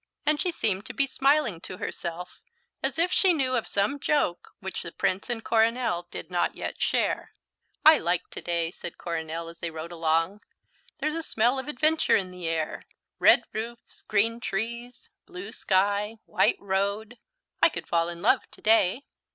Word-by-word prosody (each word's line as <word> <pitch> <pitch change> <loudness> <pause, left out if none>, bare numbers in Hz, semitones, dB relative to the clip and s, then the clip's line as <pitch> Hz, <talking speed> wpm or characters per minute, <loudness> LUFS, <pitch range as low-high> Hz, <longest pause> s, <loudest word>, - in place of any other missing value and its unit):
And 300 0 +3
she 360 - +1
seemed 205 - 0
to - - -7
be 275 - +3
smiling 275 - +2
to 185 - -8
herself 175 0 -6 0.4
as - - -1
if 345 +2 +2
she 375 -2 +4
knew 260 -5 0
of 235 - -1
some 205 +9 0
joke 280 -13 0
which 190 -2 -5
the 170 - -6
Prince 190 +8 -1
and 230 -2 -2
Coronel 225 -5 +1
did - - -7
not 175 - 0
yet - - -5
share. - - 0 0.5
"I 315 0 +9
like 175 +1 0
to - - -6
day," 170 -1 -1
said - - -8
Coronel 165 -1 -4
as 170 0 -11
they 170 - -2
rode 160 +1 -7
along. 165 +4 0 0.6
"There's 305 - -1
a 330 - -2
smell 245 -2 +1
of 265 - -6
adventure 310 +2 +2
in 185 -2 0
the 180 -2 -5
air. 160 -1 -2 0.3
Red - - +6
roofs, 230 +2 -6
green 225 +3 +1
trees, 235 +3 -4 0.2
blue 195 +4 -8
sky, 205 0 +1
white - - +2
road 200 +4 -2 0.4
I - - +7
could - - -6
fall 170 0 +1
in 170 +1 -8
love 245 +3 +3
to - - -17
day." 220 +3 +4
205 Hz, 175 wpm, -27 LUFS, 175-245 Hz, 0.6 s, I